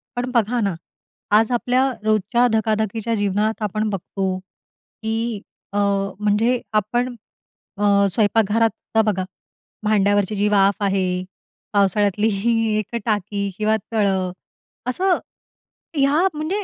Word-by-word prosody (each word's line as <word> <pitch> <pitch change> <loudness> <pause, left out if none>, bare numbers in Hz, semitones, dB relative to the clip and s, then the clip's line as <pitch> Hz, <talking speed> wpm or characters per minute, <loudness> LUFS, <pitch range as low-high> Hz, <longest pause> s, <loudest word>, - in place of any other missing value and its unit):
पण 245 +1 -2
बघा 235 +1 +2
ना, 200 -3 0 0.6
आज 220 +3 +4
आपल्या 255 +2 +2
रोजच्या 215 +3 +2
धकाधकीच्या 220 +1 0
जीवनात 210 +2 0
आपण 215 +1 -1
बघतो, 190 -1 -2
की 220 +3 -6 0.3
अ, - - -1 0.4
म्हणजे 220 +4 +2
आपण 215 +4 +1 0.7
अ, 200 -1 +3
स्वयंपाकघरात 220 +2 +3 0.3
आता 220 - +6
बघा, 185 -1 -2 0.6
भांड्यावरची 205 -1 +2
जी 205 +1 +1
वाफ 200 0 +3
आहे, 185 -2 0 0.5
पावसाळ्यातली 205 +1 +2
ही 205 +4 +1 0.3
एक 215 +3 -5
टाकी 205 -2 -1
किंवा 215 0 +2 0.2
तळं. 190 -4 +1 0.6
असं 365 +8 +2 0.8
ह्या 290 +7 +3
म्हणजे 340 +7 -2
215 Hz, 110 wpm, -21 LUFS, 200-230 Hz, 0.8 s, आता